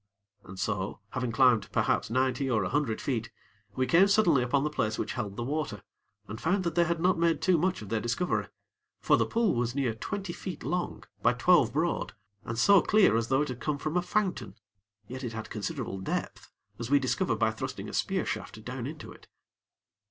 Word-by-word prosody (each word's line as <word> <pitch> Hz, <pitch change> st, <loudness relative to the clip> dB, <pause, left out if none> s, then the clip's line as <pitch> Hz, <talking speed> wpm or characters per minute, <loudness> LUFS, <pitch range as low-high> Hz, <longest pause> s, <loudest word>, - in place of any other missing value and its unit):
And 95 Hz, 0 st, -10 dB
so, 105 Hz, -2 st, -2 dB
having 125 Hz, -2 st, -2 dB
climbed 115 Hz, -4 st, +3 dB
perhaps -, -, +1 dB
ninety 130 Hz, +2 st, 0 dB
or 110 Hz, -5 st, +2 dB
a 90 Hz, -, -2 dB
hundred 140 Hz, -5 st, 0 dB
feet, 120 Hz, -4 st, -2 dB, 0.5 s
we 130 Hz, -, +1 dB
came 175 Hz, +8 st, +5 dB
suddenly 200 Hz, -9 st, +4 dB
upon 135 Hz, +3 st, +1 dB
the 150 Hz, -, -1 dB
place 110 Hz, -6 st, -1 dB
which -, -, -3 dB
held 105 Hz, -5 st, -4 dB
the 120 Hz, -, -2 dB
water, 140 Hz, -6 st, -3 dB, 0.4 s
and 110 Hz, -, -7 dB
found 185 Hz, +4 st, +1 dB
that 170 Hz, -2 st, -1 dB
they 170 Hz, +1 st, +3 dB
had 170 Hz, 0 st, -1 dB
not 180 Hz, 0 st, +2 dB
made 165 Hz, -1 st, +2 dB
too 185 Hz, -1 st, +3 dB
much 180 Hz, -, 0 dB
of 100 Hz, -, -10 dB
their 115 Hz, -, 0 dB
discovery; 120 Hz, +11 st, -1 dB, 0.5 s
for -, -, +4 dB
the -, -, +1 dB
pool 230 Hz, -4 st, +1 dB
was 120 Hz, +1 st, -1 dB
near 135 Hz, -5 st, 0 dB
twenty 190 Hz, -, -5 dB
feet 180 Hz, -3 st, -7 dB
long 160 Hz, -8 st, -2 dB, 0.2 s
by -, -, +4 dB
twelve 125 Hz, -1 st, +4 dB
broad, 160 Hz, +6 st, -1 dB, 0.3 s
and 115 Hz, -, -5 dB
so 195 Hz, -, +6 dB
clear 210 Hz, -, +4 dB
as 115 Hz, 0 st, +1 dB
though 135 Hz, +3 st, +2 dB
it 150 Hz, -, -5 dB
had 125 Hz, -1 st, -5 dB
come 150 Hz, -2 st, -1 dB
from 155 Hz, +3 st, -4 dB
a 180 Hz, -, +3 dB
fountain; 195 Hz, +1 st, -1 dB, 0.5 s
yet 130 Hz, +2 st, -7 dB
it 120 Hz, -2 st, -4 dB
had 110 Hz, 0 st, -7 dB
considerable 115 Hz, -2 st, -4 dB
depth, -, -, -4 dB, 0.3 s
as 120 Hz, 0 st, -4 dB
we 145 Hz, -, +5 dB
discovered 130 Hz, -2 st, 0 dB
by -, -, +2 dB
thrusting -, -, -5 dB
a -, -, -8 dB
spear -, -, 0 dB
shaft -, -, -5 dB
down -, -, -4 dB
into -, -, -8 dB
it. -, -, -16 dB
135 Hz, 210 wpm, -29 LUFS, 115-170 Hz, 0.5 s, so